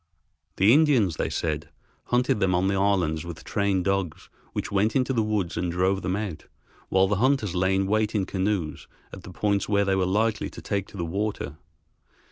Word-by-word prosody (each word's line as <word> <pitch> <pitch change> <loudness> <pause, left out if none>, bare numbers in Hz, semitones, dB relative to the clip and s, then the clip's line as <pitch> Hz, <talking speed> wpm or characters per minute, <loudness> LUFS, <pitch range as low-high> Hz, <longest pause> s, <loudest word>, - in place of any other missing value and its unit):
The 100 +5 +5
Indians, 130 - +3
they - - -1
said, 75 -1 -2 0.4
hunted 125 -3 +1
them 95 -2 +2
on 90 +2 +2
the - - +1
islands 95 -6 +1
with 85 -2 -8
trained 100 -3 0
dogs 95 -5 -2 0.2
which - - -4
went 100 +3 +1
into 130 0 +1
the 115 - +2
woods 105 -5 -1
and 90 0 -1
drove 95 +3 +1
them 90 - -1
out, 100 -6 -5 0.4
while 95 0 +4
the 100 0 0
hunters 125 -5 +1
lay 95 +1 +1
in 95 0 +1
wait 110 +2 0
in 100 -3 +1
canoes 95 -5 -2 0.3
at - - -8
the - - -11
points 100 -1 0
where 100 -1 +3
they 95 0 +2
were 95 -1 +1
likely 110 +3 0
to - - -11
take 100 -2 -2
to - - -12
the 85 - -2
water. 100 -4 -3
100 Hz, 200 wpm, -25 LUFS, 90-105 Hz, 0.4 s, The